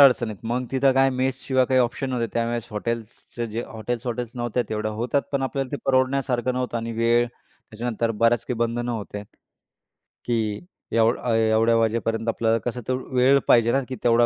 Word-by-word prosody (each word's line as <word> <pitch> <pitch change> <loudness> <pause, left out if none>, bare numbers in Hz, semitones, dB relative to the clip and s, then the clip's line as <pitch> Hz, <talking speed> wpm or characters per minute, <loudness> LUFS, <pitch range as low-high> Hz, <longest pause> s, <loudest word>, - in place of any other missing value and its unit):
अडचणीत 120 -6 +5
मग 125 +1 0
तिथं 135 0 +3
काय 135 +1 +4
मेस 130 +1 -1
शिवाय 130 -1 +3
काही 130 0 +3
ऑप्शन 125 +2 -1
नव्हते. 120 -2 -1
त्यावेळेस 115 -1 -1
हॉटेल्सचे 115 +2 -4
जे 115 +1 -4
हॉटेल्स, 115 +2 -5
हॉटेल्स 120 -1 -3
नव्हत्या 120 0 -1
तेवढ्या 110 0 -2
होतात 120 +6 0
पण 140 -1 0
आपल्याला 135 0 -2
ते - - 0
परवडण्यासारखं 130 -1 +1
नव्हतं. 125 -2 -2
आणि 115 0 -3
वेळ 115 +1 +3
त्याच्यानंतर 115 -1 -5
बऱ्याच 115 +1 +2
काही 125 - -2
बंधनं 120 +1 -1
होते. 105 -2 -5 1.0
की 110 +2 -1 0.3
एवढं 115 +1 +3
अ, 120 - 0
एवढ्या 110 +1 +3
वाजेपर्यंत 115 0 0
आपल्याला 115 0 +2
कसं 125 0 -2
तर 130 - +1 0.2
वेळ 130 +2 +5
पाहिजे 115 -1 +5
ना, 135 - +2
की 130 - -3
तेवढ्या 120 0 +5
120 Hz, 175 wpm, -24 LUFS, 115-130 Hz, 1.0 s, अडचणीत